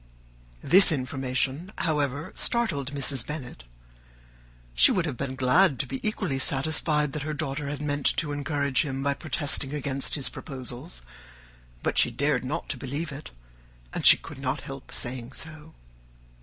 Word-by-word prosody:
This 190 0 +9
information, 130 +4 -2
however, 150 0 -1
startled 165 - 0
Mrs. 135 -3 +2
Bennet: 125 - -8 1.1
she - - +6
would 180 -3 +1
have 145 -6 -3
been 130 +1 -4
glad 135 +4 +3
to 135 - 0
be 135 +1 -5
equally 190 -10 -2
satisfied 150 +2 +1
that 150 - -4
her 155 +1 -4
daughter 145 -1 -3
had 145 +1 -4
meant 145 -1 0
to 150 -3 -1
encourage 145 -2 0
him 135 -2 -4
by 140 0 +1
protesting 145 -1 0
against 140 -1 0
his 140 -4 +2
proposals, 125 - -5 0.8
but - - +2
she - - +4
dared - - 0
not - - -4
believe 145 +5 -4
it, 140 +2 -9 0.6
and - - -4 0.2
could - - -10
not 135 +1 -2
help 135 -1 -10
saying 125 0 -4
so. 155 +1 -8
140 Hz, 145 wpm, -26 LUFS, 130-150 Hz, 1.1 s, This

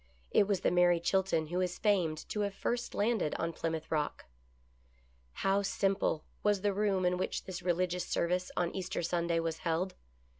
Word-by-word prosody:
It 200 - +4
was 200 -3 +1
the - - +2
Mary 175 -1 +4
Chilton 175 -2 +1
who 180 +2 0
is 180 -1 -1
famed 175 -7 +1
to 210 - -2
have 200 -1 -1
first 240 +3 -2
landed 210 -6 +1
on 165 0 -2
Plymouth 160 -1 -3
Rock. 150 -2 -1 1.2
How 195 +1 +4
simple 195 -4 0 0.2
was 205 -2 +2
the 205 0 +1
room 195 -2 +1
in 180 0 +2
which 185 - -2
this 185 -1 -6
religious 180 0 0
service 180 +1 0
on 175 -1 0
Easter 190 -1 -3
Sunday 170 0 +1
was 165 -1 -2
held 175 +3 -1
180 Hz, 175 wpm, -32 LUFS, 170-195 Hz, 1.2 s, It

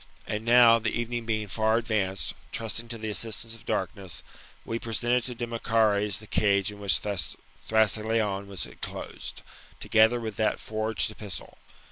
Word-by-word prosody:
And 105 +1 -3
now, 115 0 +7
the 110 -1 0
evening 120 0 -3
being 110 -2 0
far 110 +3 +2
advanced, 105 -5 0 0.2
trusting 115 +1 -3
to 115 0 -5
the 110 -1 -4
assistance 115 +1 -2
of 115 0 -13
darkness, 95 -4 -3 0.4
we 115 - -2
presented 120 +1 0
to 125 - -2
Demochares 115 -3 +1
the 110 - -11
cage 100 -2 +2
in 105 - -11
which 100 -1 +4
Thrasyleon 105 0 0
was 95 -6 -3
enclosed, - - -7 0.4
together 110 +2 +4
with 110 -3 -5
that 110 -1 +1
forged 110 +1 -1
epistle. 100 -7 -7
110 Hz, 145 wpm, -28 LUFS, 105-115 Hz, 0.4 s, now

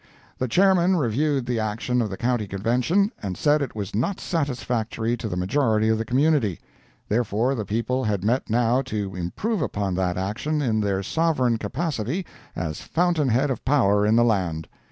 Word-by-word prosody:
] - - -30
The 130 - 0
Chairman 185 +5 +4
reviewed 140 -1 0
the 120 -2 -1
action 110 +3 -1
of 110 - -1
the 95 - -6
County 120 -3 0
Convention, 125 - +1
and 95 -3 -4
said 150 0 +3
it 135 -6 -4
was 100 -3 -5
not 130 - -1
satisfactory 120 -7 -1
to 115 - -5
the 90 - -3
majority 110 +2 +1
of 110 0 +2
the 115 - -2
community; 130 - +2 0.5
therefore 115 +3 +1
the 110 -6 -3
people 115 +5 -1
had 100 -3 -1
met 120 +5 0
now 120 +3 +2
to 105 -7 -4
improve 165 - -2
upon 100 -9 -1
that 90 -1 -1
action 105 +11 -2
in 115 -6 +1
their 100 -2 0
sovereign 130 - +1
capacity 130 - -3 0.3
as 80 -2 -4
fountain 170 -5 +1
head 130 +5 +2
of 125 - -4
power 105 -8 +3
in 105 +2 +3
the 120 0 +5
land. 90 -8 0
120 Hz, 180 wpm, -24 LUFS, 105-140 Hz, 0.5 s, the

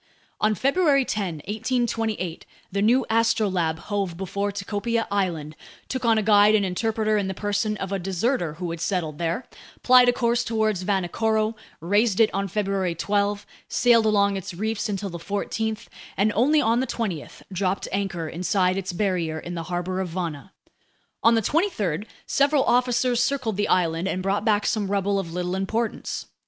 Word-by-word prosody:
On 215 0 +2
February 275 - +3
10, 180 -10 -3
1828, 220 -5 -2 0.2
the 200 +1 -1
new 240 +4 +3
Astrolabe 205 -8 +1
hove 195 -1 -3
before 200 +2 -2
Tikopia 205 +3 -2
Island, 170 -7 -1 0.3
took 260 -1 -3
on 225 -1 +4
a 215 - +1
guide 210 0 +6
and 205 -2 +2
interpreter 215 +3 0
in 195 - -2
the 190 - -4
person 210 +1 -1
of 195 0 -5
a 195 - -1
deserter 185 - -1
who 175 +1 -4
had 165 -1 -6
settled 175 -5 -2
there, 170 +8 -1 0.4
plied 250 -1 +7
a - - +6
course 240 -1 +1
toward 220 -3 0
Vanikoro, 215 +4 0 0.3
raised 205 +4 +2
it 225 - +4
on 195 0 -1
February 195 -3 -1
12, 205 +3 0 0.2
sailed 230 -2 +4
along 200 -2 +3
its 190 -1 -6
reefs 215 +3 -2
until 200 -1 -3
the 170 - -6
14th, 215 +4 -3 0.3
and 205 +2 +2
only 285 +8 +3
on 230 -1 +2
the 260 - -1
20th 190 -10 -4
dropped 185 +1 -1
anchor 190 -4 -2
inside 180 +3 0
its 185 -1 -5
barrier 175 -5 -1
in 175 +2 -6
the 170 - -3
harbor 180 +1 -2
of 190 -2 -2
Vana. 165 -1 -5 0.7
On 230 0 +5
the 225 - +1
23rd, 215 - 0 0.2
several 280 0 +3
officers 245 0 +2
circled 255 -7 0
the 205 +1 0
island 170 0 +1
and 185 -1 -2
brought 195 +2 0
back 210 -2 +2
some 205 -3 0
rubble 200 0 +1
of 170 -4 -5
little 180 +1 -2
importance. 220 +4 -2
200 Hz, 170 wpm, -24 LUFS, 185-225 Hz, 0.7 s, plied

